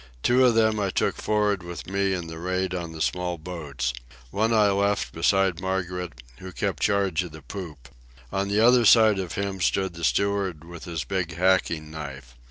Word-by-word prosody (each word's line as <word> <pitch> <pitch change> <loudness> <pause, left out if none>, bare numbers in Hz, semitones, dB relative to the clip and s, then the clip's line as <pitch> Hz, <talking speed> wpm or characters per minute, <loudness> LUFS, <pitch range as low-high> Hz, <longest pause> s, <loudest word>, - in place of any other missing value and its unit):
Two 125 +2 +4
of 120 -2 +4
them 110 -1 +3
I 100 -2 0
took - - 0
for'ard 105 -2 +1
with 85 -3 -8
me 100 +1 0
in 90 -2 -3
the 80 0 -8
raid 95 +1 -1
on 85 -2 -4
the 80 -1 -3
small 90 +2 -1
boats. 75 -7 -4 0.4
One 110 +3 +1
I 105 -3 +4
left 100 +1 0
beside 95 +1 +2
Margaret, 90 -7 -3 0.2
who 95 0 -8
kept - - -3
charge 100 -4 +1
of 90 -4 -7
the 80 -2 -11
poop. 75 -4 -8 0.5
On 100 +1 0
the 100 +1 +1
other 120 +1 +6
side 110 -2 +6
of 90 -4 -4
him 100 -1 -3
stood 95 +1 +1
the 85 0 -9
steward 100 -3 0
with 85 0 -10
his 85 -3 -3
big 90 -4 -3
hacking 85 -4 +1
knife. 70 -5 -8
95 Hz, 190 wpm, -25 LUFS, 85-100 Hz, 0.5 s, other